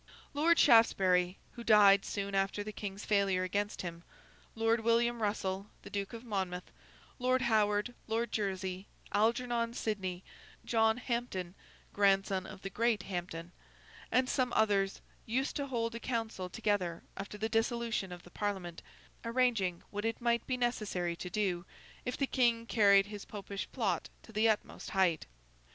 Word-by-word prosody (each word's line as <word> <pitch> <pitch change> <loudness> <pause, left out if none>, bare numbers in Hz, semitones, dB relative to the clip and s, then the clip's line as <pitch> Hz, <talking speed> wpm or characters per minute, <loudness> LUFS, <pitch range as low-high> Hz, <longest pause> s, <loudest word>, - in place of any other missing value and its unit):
Lord 325 +4 +4
Shaftesbury 185 -6 +5
(who 235 - -9
died 205 -3 +6
soon 200 0 -3
after 195 +1 0
the 215 - -5
King's 200 -1 -6
failure 195 -3 +2
against 205 +3 -2
him), 170 -1 -6 0.5
Lord 225 +1 +2
William 235 +1 +2
Russell, 200 -2 -1 0.2
the - - -10
Duke 200 -1 -3
of 230 0 -7
Monmouth, 190 -5 -3 0.5
Lord 255 0 +2
Howard, 215 0 +2
Lord 225 +1 -1
Jersey, 190 -2 -2 0.2
Algernon 235 +1 +1
Sidney, 190 -6 -3 0.4
John 225 -1 +3
Hampden 235 -8 -3 0.4
(grandson 195 -1 +2
of 190 - -11
the 195 - -5
great 230 +1 +1
Hampden), 175 -2 -5 0.6
and 255 0 +3
some 255 -1 +1
others, 200 -3 +2 0.3
used 260 +5 0
to 285 -1 -2
hold 230 -3 -1
a 230 - -5
council 225 -7 -3
together 195 -5 -1
after 200 +1 -6
the 220 +1 -1
dissolution 225 -3 0
of 175 -1 -8
the 175 - -15
Parliament, 190 -5 -3 0.4
arranging 230 -7 +1
what 205 0 -3
it 225 0 -1
might 235 -1 +1
be 255 - 0
necessary 210 -8 -1
to 180 - -6
do, 180 -3 0 0.4
if 250 - -2
the 275 - +1
King 235 -3 +2
carried 200 -4 +5
his 205 0 -8
Popish 200 -2 -6
plot 200 -9 -1
to - - -14
the 220 +1 +3
utmost 215 - -2
height. 185 -5 +2
210 Hz, 150 wpm, -33 LUFS, 190-230 Hz, 0.6 s, died